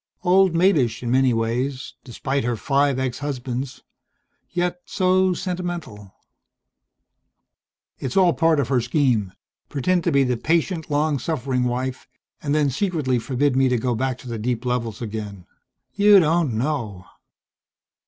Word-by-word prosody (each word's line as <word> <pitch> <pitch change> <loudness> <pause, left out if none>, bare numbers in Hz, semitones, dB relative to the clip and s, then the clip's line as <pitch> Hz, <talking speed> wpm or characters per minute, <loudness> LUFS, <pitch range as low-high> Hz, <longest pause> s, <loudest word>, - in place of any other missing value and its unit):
Old 185 -1 +4
maidish 140 - +2
in 120 - -2
many 130 0 +4
ways, 120 +4 -2
despite 135 +2 -3
her 120 0 -1
five 140 +3 +1
ex 130 -1 -2
husbands; 130 -2 -4 0.7
yet 180 0 -2
so 185 -1 +2
sentimental 175 - -5 1.9
"It's 130 +3 -3
all 180 -3 +5
part 165 -2 +2
of 130 -4 -1
her 130 -3 +2
scheme. 120 - +1 0.4
Pretend 170 +6 0
to 170 - +2
be 140 -1 +4
the 125 -2 0
patient, 165 +4 0
long 150 -1 +1
suffering 130 -3 -1
wife 125 +1 -3 0.3
and 145 0 -1
then 145 -2 +2
secretly 150 -6 0
forbid 130 +3 0
me 135 0 +3
to 125 - +1
go 125 +1 -1
back 130 +2 -1
to 130 - -13
the 115 -2 -4
deep 120 +2 -2
levels 120 -3 -2
again! 105 -4 -6 0.5
You 205 -1 +6
don't 160 -6 +1
know!" 115 -8 -3
135 Hz, 145 wpm, -22 LUFS, 120-165 Hz, 1.9 s, You